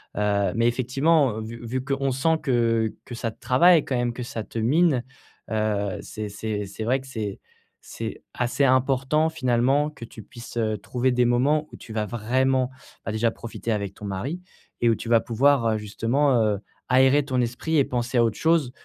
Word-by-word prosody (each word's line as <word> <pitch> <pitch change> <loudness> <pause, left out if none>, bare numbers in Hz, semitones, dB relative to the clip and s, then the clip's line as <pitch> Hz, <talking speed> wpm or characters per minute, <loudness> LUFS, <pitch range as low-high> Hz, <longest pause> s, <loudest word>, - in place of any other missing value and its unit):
Heu 100 -1 +1
mais 115 +1 +3
effectivement, 130 +1 +2
heu, - - -4
vu 115 +2 -7
-vu 130 +2 -2
qu'on 135 0 -1
sent 160 +5 +2
que 115 -4 +1
que - - -10
ça 115 0 -3
te - - -25
travaille 165 +5 +5
quand 130 - -2
même, 120 -1 0
que 125 +1 -5
ça 115 -2 -5
te - - -8
mine, 140 +2 +3 0.5
heu, 105 -2 -1
c'est 110 -1 -6
c'est 105 0 -4
c'est 100 +3 -6
vrai 130 +3 +1
que 135 - -14
c'est 110 -6 -5 0.4
c'est - - -6
assez 120 +3 0
important, 135 +4 +2
finalement, 135 0 +1
que 145 -6 -10
tu 115 - -12
puisses, 120 +3 -12
heu, 110 -2 0
trouver 125 +5 -1
des 125 0 +2
moments 140 +6 +2
où - - -10
tu 110 - -11
vas 110 -1 -1
vraiment, 130 +4 +1 0.3
bah, 110 - -3
déjà 115 +1 +1
profiter 115 0 -6
avec 100 -2 -2
ton 105 - -9
mari 105 - -4 0.4
et 120 - +4
où - - +4
tu 115 - -7
vas 115 -1 +6
pouvoir, 125 +3 +2
heu, 110 -1 +1
justement, 115 +7 0
heu, 105 -2 +1 0.3
aérer 135 +2 +4
ton 130 -3 0
esprit 125 +7 -1
et - - +5
penser 120 -1 -1
à 115 - +5
autre 110 -2 0
chose 160 -6 +2
120 Hz, 200 wpm, -24 LUFS, 110-135 Hz, 0.5 s, vas